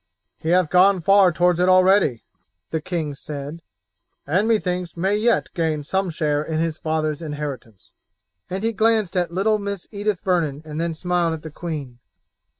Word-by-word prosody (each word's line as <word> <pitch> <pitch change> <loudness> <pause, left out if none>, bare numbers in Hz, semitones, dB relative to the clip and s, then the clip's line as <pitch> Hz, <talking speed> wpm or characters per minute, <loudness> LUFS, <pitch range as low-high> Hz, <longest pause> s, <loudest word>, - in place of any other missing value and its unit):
"He 160 - -3
hath 175 -2 +3
gone 185 +1 +5
far 195 0 +5
towards 175 +1 +2
it 180 +1 +3
already," 185 - +4 0.5
the 160 - -1
king 160 -4 -3
said, 145 +3 -7 0.6
"and 185 +9 +1
methinks 180 -6 -1
may 190 +4 +1
yet 230 +2 +1
gain 160 -4 -1
some 190 +5 -1
share 150 -2 0
in 155 +1 -3
his 165 -1 -1
father's 155 -1 -1
inheritance," 145 - -7 0.6
and 190 +3 -4
he 225 0 0
glanced 220 -3 +1
at 175 -2 +1
little 210 +4 +1
Mistress 200 -2 -5
Edith 205 -2 -2
Vernon 160 -6 0
and 155 +1 -4
then 170 -1 -2
smiled 175 -1 0
at 155 - -11
the 160 - -8
queen. 145 -7 -6
175 Hz, 165 wpm, -22 LUFS, 155-190 Hz, 0.6 s, gone